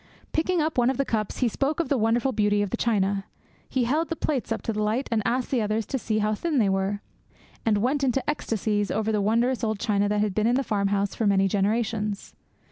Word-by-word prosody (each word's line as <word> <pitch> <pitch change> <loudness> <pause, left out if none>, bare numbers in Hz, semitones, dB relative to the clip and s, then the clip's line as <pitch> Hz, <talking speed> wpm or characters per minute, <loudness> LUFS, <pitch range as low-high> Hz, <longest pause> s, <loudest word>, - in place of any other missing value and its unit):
Picking 335 +2 +1
up 310 -4 0
one 240 +1 +4
of 265 - -1
the 275 - +1
cups, 215 -1 -2
he 250 - +4
spoke 275 +7 -1
of 335 - 0
the 285 - +1
wonderful 235 +3 +2
beauty 205 -3 +2
of 200 - -4
the - - 0
china. 200 -3 0 0.4
He 260 - +1
held 305 +7 0
the 330 - -1
plates 280 -7 -2
up 225 - -2
to 225 - -2
the 215 - -2
light 220 +6 0
and 225 -2 +2
asked 250 +1 0
the 255 -4 +2
others 215 +1 -1
to 265 - -3
see 220 -2 -1
how 215 0 +1
thin 305 +7 -1
they 215 -5 +3
were, 195 +1 -1 0.7
and 215 -2 +4
went 265 +7 0
into 265 0 0
ecstasies 215 -7 -1
over 220 +1 0
the 210 -1 +1
wondrous 235 +5 +1
old 220 -1 0
china 205 -2 +1
that 210 0 +1
had 210 -2 0
been 215 +3 +1
in 240 - +3
the 270 - +1
farm 200 -5 0
house 200 0 0
for 220 - 0
many 195 -1 +3
generations. 210 +1 -1
220 Hz, 245 wpm, -25 LUFS, 205-255 Hz, 0.7 s, one